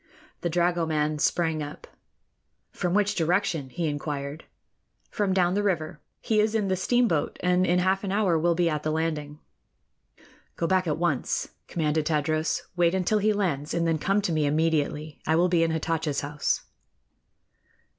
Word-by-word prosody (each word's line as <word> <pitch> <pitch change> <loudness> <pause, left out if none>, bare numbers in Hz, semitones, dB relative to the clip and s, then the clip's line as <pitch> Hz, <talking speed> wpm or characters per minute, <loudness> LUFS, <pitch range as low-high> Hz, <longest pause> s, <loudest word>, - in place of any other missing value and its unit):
The 175 - -2
dragoman 160 -3 +1
sprang 160 -1 +1
up. 145 0 -7 0.9
"From 180 +1 -1
which 205 0 +2
direction?" 170 -5 0
he 170 +5 -3
inquired. 145 0 -4 0.7
"From 205 -3 0
down 180 -1 +2
the 205 - +1
river. 170 -5 -1 0.2
He 220 -1 +1
is 215 +1 +2
in 210 -3 +1
the 190 - +2
steamboat, 190 -5 +1
and 180 +1 +3
in 175 - +3
half 190 +2 +1
an 195 - -2
hour 195 -5 +2
will 170 +1 +2
be 175 0 +2
at 150 -2 -1
the 155 - -2
landing." 155 -2 -2 1.2
"Go - - -1
back 185 0 +2
at 150 - 0
once," 165 -6 -1 0.2
commanded 155 -2 0
Tadros. 155 0 0
"Wait 175 0 +3
until 190 +3 +1
he 215 +1 +2
lands, 165 -9 -1
and 170 0 +1
then 165 -1 +1
come 195 +5 +1
to 180 - 0
me 155 -2 +1
immediately. 155 0 0
I 160 - +3
will 175 +2 +3
be 175 -2 +3
in 165 - +2
Hatatcha's 160 -2 -1
house." 145 +1 -1
165 Hz, 165 wpm, -26 LUFS, 155-185 Hz, 1.2 s, and